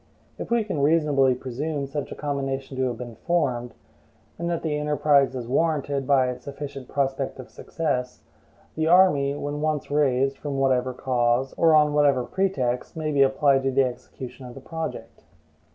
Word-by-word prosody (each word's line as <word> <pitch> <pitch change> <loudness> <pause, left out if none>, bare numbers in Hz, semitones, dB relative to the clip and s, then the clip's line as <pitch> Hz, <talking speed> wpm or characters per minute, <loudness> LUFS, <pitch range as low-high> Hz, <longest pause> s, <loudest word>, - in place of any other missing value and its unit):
If - - -5
we 235 -1 +2
can 190 -9 -3
reasonably 145 -4 +3
presume 140 +4 -4
such 140 0 -5
a - - -5
combination 135 -2 -3
to 130 0 0
have 120 -2 -4
been 120 -2 -8
formed, 125 -9 -1 0.6
and 170 0 -2
that 170 -1 -2
the 155 -2 -1
enterprise 150 -2 +2
is 120 -2 -5
warranted 140 -1 0
by 135 -2 +4
a 125 0 -3
sufficient 140 0 -8
prospect 135 -1 -2
of 130 - -11
success, 130 -6 -3 0.5
the 160 0 -1
army, 160 -6 +4
when 145 0 -4
once 155 -2 -1
raised, 135 -2 +1
from 145 -2 -4
whatever 130 -1 +2
cause, 125 0 0
or 165 -2 +4
on 150 -1 +4
whatever 140 -4 +3
pretext, 130 -9 -2
may 155 -1 -2
be 140 -2 +2
applied 135 0 +4
to 135 - 0
the 135 +1 +3
execution 125 +1 -7
of 120 - -11
the - - -8
project. 160 +4 -6
140 Hz, 170 wpm, -24 LUFS, 130-150 Hz, 0.6 s, by